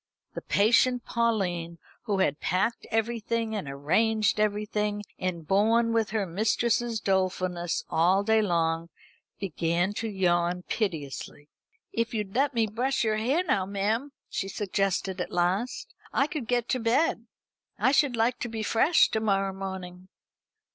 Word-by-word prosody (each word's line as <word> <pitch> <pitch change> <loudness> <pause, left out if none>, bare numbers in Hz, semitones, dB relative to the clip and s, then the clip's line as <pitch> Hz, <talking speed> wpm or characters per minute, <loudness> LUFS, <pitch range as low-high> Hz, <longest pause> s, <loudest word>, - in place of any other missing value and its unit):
The - - -5
patient 240 +4 +3
Pauline, 185 -8 -1 0.3
who 205 -4 0
had 145 -5 +1
packed 190 +6 -1
everything 225 0 -1
and 190 -9 -4
arranged 210 +10 +1
everything, 210 0 0 0.2
and 170 -4 -3
borne 230 +4 +3
with 225 -2 +1
her 215 -2 -1
mistress's 225 +5 0
dolefulness 185 -3 -1
all 180 +5 +3
day 220 +1 +3
long, 165 -3 0 0.5
began 175 +1 0
to 225 +2 -3
yawn 180 -2 +1
piteously. 150 - -4 0.4
"If 230 0 -1
you'd 210 -3 -3
let 275 +1 +1
me 225 -1 +3
brush 245 +6 -1
your 215 -1 +1
hair 265 +11 +1
now, 195 - 0
ma'am," 215 +8 -1 0.2
she 195 - -3
suggested 195 -2 -1
at - - -4
last, 200 - -1 0.2
"I 275 - +2
could 295 -5 -5
get 240 -1 0
to 255 - +1
bed. 230 0 +1 0.5
I 260 - +3
should 280 -3 +3
like 230 +2 +1
to 240 - -3
be 225 -1 -4
fresh 270 +10 +4
to 220 - 0
morrow 195 -3 +1
morning." 185 -1 -7
210 Hz, 145 wpm, -27 LUFS, 185-230 Hz, 0.5 s, fresh